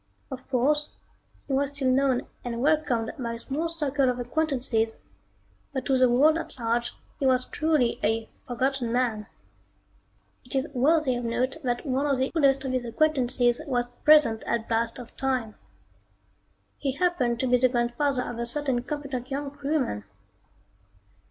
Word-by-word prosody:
Of 260 Hz, 0 st, -8 dB
course, 290 Hz, +4 st, +1 dB, 0.6 s
he 275 Hz, -, -4 dB
was 275 Hz, +1 st, +1 dB
still 275 Hz, -2 st, 0 dB
known 260 Hz, -1 st, +2 dB, 0.2 s
and 235 Hz, -1 st, -4 dB
welcomed 265 Hz, -5 st, +1 dB
by 235 Hz, -2 st, -3 dB
a -, -, -5 dB
small 290 Hz, +8 st, -3 dB
circle 290 Hz, -5 st, 0 dB
of 250 Hz, -, -1 dB
acquaintances, 245 Hz, -4 st, +1 dB, 0.8 s
but 265 Hz, -2 st, -3 dB
to 270 Hz, -, +2 dB
the 255 Hz, -1 st, +4 dB
world 300 Hz, +7 st, +4 dB
at -, -, -8 dB
large 235 Hz, 0 st, -1 dB, 0.2 s
he 270 Hz, -, +1 dB
was 255 Hz, -1 st, +3 dB
truly 305 Hz, -7 st, +1 dB
a 225 Hz, +1 st, 0 dB, 0.2 s
"forgotten 255 Hz, 0 st, -1 dB
man." 230 Hz, -4 st, 0 dB, 1.2 s
It 250 Hz, -, -7 dB
is 265 Hz, +1 st, +1 dB
worthy 280 Hz, 0 st, +3 dB
of 245 Hz, -, -4 dB
note 245 Hz, +5 st, -1 dB
that 245 Hz, -1 st, -2 dB
one 275 Hz, +1 st, 0 dB
of 275 Hz, -2 st, +1 dB
the 260 Hz, +1 st, 0 dB
oldest 275 Hz, -3 st, +3 dB
of 265 Hz, -, -2 dB
these 255 Hz, -1 st, -1 dB
acquaintances 245 Hz, -2 st, +2 dB
was 245 Hz, -2 st, -1 dB
present 300 Hz, -8 st, +5 dB
at 230 Hz, -1 st, -1 dB
blast 230 Hz, +1 st, 0 dB
off 245 Hz, -, -11 dB
time. 255 Hz, -5 st, -1 dB, 1.3 s
He 275 Hz, -2 st, -1 dB
happened 275 Hz, -7 st, 0 dB
to 260 Hz, -, 0 dB
be 250 Hz, -1 st, +3 dB
the 255 Hz, +1 st, +4 dB
grandfather 250 Hz, +2 st, 0 dB
of 235 Hz, -, -6 dB
a 235 Hz, -, -1 dB
certain 265 Hz, -1 st, +2 dB
competent 265 Hz, -2 st, -5 dB
young 280 Hz, 0 st, -3 dB
crewman. 280 Hz, -, -2 dB
255 Hz, 160 wpm, -26 LUFS, 240-280 Hz, 1.3 s, present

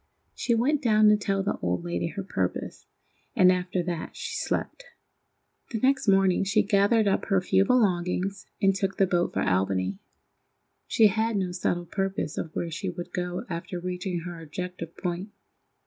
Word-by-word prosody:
She 235 Hz, -, 0 dB
went 275 Hz, +6 st, +2 dB
down 215 Hz, -4 st, +5 dB
to 210 Hz, -, +6 dB
tell 195 Hz, -1 st, -1 dB
the 200 Hz, -, -1 dB
old 90 Hz, -1 st, -1 dB
lady 85 Hz, 0 st, -2 dB
her 195 Hz, -, -5 dB
purpose, 195 Hz, -, -3 dB, 0.5 s
and 185 Hz, -5 st, +6 dB
after 180 Hz, 0 st, -1 dB
that 170 Hz, -2 st, -4 dB
she -, -, -5 dB
slept. -, -, -2 dB, 0.9 s
The 230 Hz, -, -2 dB
next 265 Hz, +1 st, +2 dB
morning 195 Hz, -1 st, +4 dB
she 200 Hz, +2 st, +2 dB
gathered 205 Hz, +2 st, +3 dB
up 195 Hz, -, +1 dB
her 195 Hz, -, +2 dB
few 190 Hz, +1 st, +2 dB
belongings 195 Hz, -4 st, +1 dB
and 195 Hz, -1 st, +4 dB
took 195 Hz, 0 st, -2 dB
the 195 Hz, -, +4 dB
boat 175 Hz, -1 st, +1 dB
for -, -, -1 dB
Albany. 95 Hz, 0 st, 0 dB, 0.9 s
She 225 Hz, -, +4 dB
had 220 Hz, +2 st, +2 dB
no 185 Hz, -2 st, -1 dB
settled 175 Hz, -1 st, -2 dB
purpose 195 Hz, -4 st, -2 dB
of 165 Hz, -, -4 dB
where 170 Hz, -, -2 dB
she 185 Hz, +4 st, -3 dB
would 175 Hz, -1 st, -7 dB
go 180 Hz, +4 st, -3 dB
after 175 Hz, 0 st, -5 dB
reaching 180 Hz, 0 st, -3 dB
her 170 Hz, -1 st, -7 dB
objective 170 Hz, +1 st, -6 dB
point. 180 Hz, +2 st, -3 dB
185 Hz, 170 wpm, -27 LUFS, 175-205 Hz, 0.9 s, to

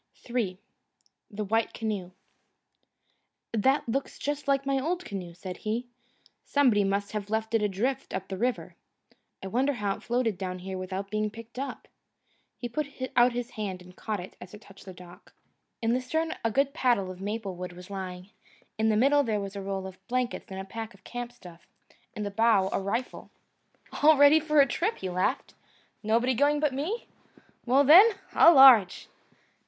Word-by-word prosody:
III 230 Hz, -7 st, -2 dB, 0.7 s
The 210 Hz, -1 st, -4 dB
White 225 Hz, +3 st, 0 dB
Canoe 210 Hz, -5 st, -3 dB, 1.4 s
"That 265 Hz, +6 st, +2 dB
looks 270 Hz, +4 st, -3 dB
just 290 Hz, 0 st, -4 dB
like 275 Hz, 0 st, +1 dB
my 275 Hz, 0 st, +1 dB
old 350 Hz, +6 st, -2 dB
canoe," 180 Hz, -4 st, -7 dB
said 180 Hz, +1 st, -7 dB
he. 225 Hz, +3 st, -3 dB, 0.6 s
"Somebody 250 Hz, -8 st, +3 dB
must 200 Hz, +1 st, -1 dB
have 210 Hz, -1 st, -4 dB
left 220 Hz, +1 st, -2 dB
it 225 Hz, -, +3 dB
adrift 225 Hz, +7 st, -1 dB
up 190 Hz, 0 st, -4 dB
the 190 Hz, -, -5 dB
river. 245 Hz, +6 st, -2 dB, 0.7 s
I -, -, -4 dB
wonder 265 Hz, +7 st, +1 dB
how 205 Hz, -5 st, -2 dB
it -, -, -14 dB
floated 235 Hz, -5 st, -1 dB
down 185 Hz, -1 st, -4 dB
here 190 Hz, +1 st, -6 dB
without 190 Hz, +1 st, -5 dB
being 215 Hz, 0 st, 0 dB
picked 230 Hz, +3 st, -11 dB
up." 275 Hz, -, -6 dB, 0.7 s
He 240 Hz, -, -5 dB
put 285 Hz, +5 st, -3 dB, 0.3 s
out 240 Hz, 0 st, +5 dB
his 245 Hz, 0 st, -4 dB
hand 195 Hz, -5 st, -5 dB
and 180 Hz, 0 st, -16 dB
caught 215 Hz, 0 st, -4 dB
it, 180 Hz, +2 st, -9 dB
as 180 Hz, +3 st, -10 dB
it 210 Hz, -, -14 dB
touched 195 Hz, -2 st, -16 dB
the 190 Hz, -, -8 dB
dock. 180 Hz, +2 st, -15 dB, 0.5 s
In 225 Hz, +1 st, +2 dB
the 255 Hz, -, 0 dB
stern 320 Hz, +5 st, -2 dB
a 230 Hz, -, +2 dB
good 275 Hz, +5 st, +1 dB
paddle 240 Hz, -, +1 dB
of 185 Hz, 0 st, -11 dB
maple 205 Hz, -1 st, -4 dB
wood 180 Hz, 0 st, -7 dB
was 180 Hz, +2 st, -12 dB
lying; 185 Hz, 0 st, -7 dB, 0.5 s
in 220 Hz, 0 st, +3 dB
the 215 Hz, -, +2 dB
middle 280 Hz, +5 st, +4 dB
there 220 Hz, -6 st, -1 dB
was 200 Hz, 0 st, -6 dB
a 200 Hz, -, -4 dB
roll 195 Hz, -1 st, -4 dB
of 190 Hz, -1 st, -9 dB
blankets 250 Hz, -1 st, -2 dB
and 190 Hz, -, -5 dB
a 190 Hz, -, -6 dB
pack 225 Hz, +3 st, -7 dB
of -, -, -23 dB
camp 245 Hz, 0 st, -6 dB
stuff; 175 Hz, -8 st, -15 dB, 0.5 s
in 210 Hz, -, -4 dB
the 205 Hz, -, -4 dB
bow 205 Hz, -2 st, +3 dB
a -, -, 0 dB
rifle. 205 Hz, +6 st, -4 dB, 0.7 s
"All 305 Hz, +1 st, +6 dB
ready 285 Hz, +2 st, +7 dB
for 305 Hz, -2 st, +3 dB
a -, -, +6 dB
trip," 365 Hz, -, -1 dB
he 190 Hz, -, -5 dB
laughed. 185 Hz, +1 st, -1 dB, 0.5 s
"Nobody 230 Hz, +4 st, +2 dB
going 290 Hz, +4 st, +2 dB
but 295 Hz, -3 st, +1 dB
me? 330 Hz, -, -3 dB, 0.6 s
Well, 265 Hz, +4 st, +5 dB
then, 380 Hz, +10 st, +8 dB, 0.2 s
au 335 Hz, -, +8 dB
large!" 250 Hz, -9 st, +7 dB
220 Hz, 185 wpm, -28 LUFS, 195-260 Hz, 1.4 s, then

